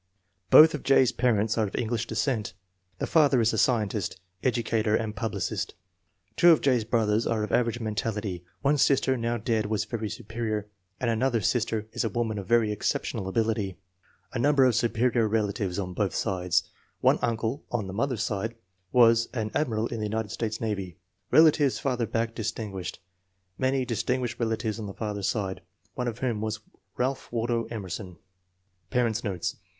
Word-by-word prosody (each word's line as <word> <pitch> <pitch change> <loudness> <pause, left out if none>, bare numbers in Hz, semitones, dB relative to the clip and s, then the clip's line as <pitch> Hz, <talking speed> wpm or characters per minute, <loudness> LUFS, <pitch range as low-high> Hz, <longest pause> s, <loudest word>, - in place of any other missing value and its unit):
Both 160 +1 +9
of 150 - -3
J.'s 130 -2 +4
parents 115 -3 +1
are 110 - +2
of - - -7
English 115 0 -1
descent. 110 -3 -1 0.4
The - - -2
father 145 -5 +4
is 115 0 +2
a - - -1
scientist, 105 -5 0 0.2
educator, 115 -3 +1
and 110 -1 -2
publicist. 115 -3 -3 0.6
Two 175 - +6
of 165 - +7
J.'s 125 -5 +3
brothers 110 -1 +1
are 110 -2 0
of 105 - -4
average 120 -1 +1
mentality; 105 -4 -3 0.2
one 145 +1 +3
sister, 135 -1 +3
now 120 -1 -1
dead, 110 -1 0
was 110 -1 -1
very 110 -3 -4
superior, 110 -1 -4 0.3
and 120 -2 +1
another 120 +1 +1
sister 110 +1 0
is - - -1
a 115 - 0
woman 110 0 -1
of 95 - -8
very 115 -2 +3
exceptional 100 -2 -2
ability. 110 -2 -1 0.6
A 125 - -2
number 140 +1 +4
of 125 - +4
superior 120 0 +2
relatives 105 -4 -1
on 90 -2 -3
both 100 +1 -1
sides. 90 -2 +1 0.4
One - - +4
uncle, 115 +4 -1
on 115 -4 -2
the 95 - -6
mother's 115 +1 -1
side, 110 +2 -2 0.4
was 115 -2 +5
an 110 -3 -2
Admiral 115 -7 0
in 115 -1 -4
the 105 - -1
United 110 0 -2
States 110 0 -3
Navy. 100 -5 -3 0.3
Relatives 150 -4 +5
farther 125 -5 -1
back 115 0 -1
distinguished. 105 -5 -4 0.6
Many 130 0 +1
distin 125 +2 -1
guished 120 -2 -4
relatives 110 -1 -1
on 105 -2 -5
father's 105 -3 -2
side, 95 -4 -2 0.3
one 125 -2 -3
of 115 -2 -3
whom 120 -5 -1
was 110 0 -2 0.4
Ralph 130 +2 -2
Waldo 115 0 0
Emerson. 95 -4 -6 0.7
Parents 115 -2 0
9 100 -4 -1
notes. 90 - -3
115 Hz, 170 wpm, -27 LUFS, 105-120 Hz, 0.7 s, Both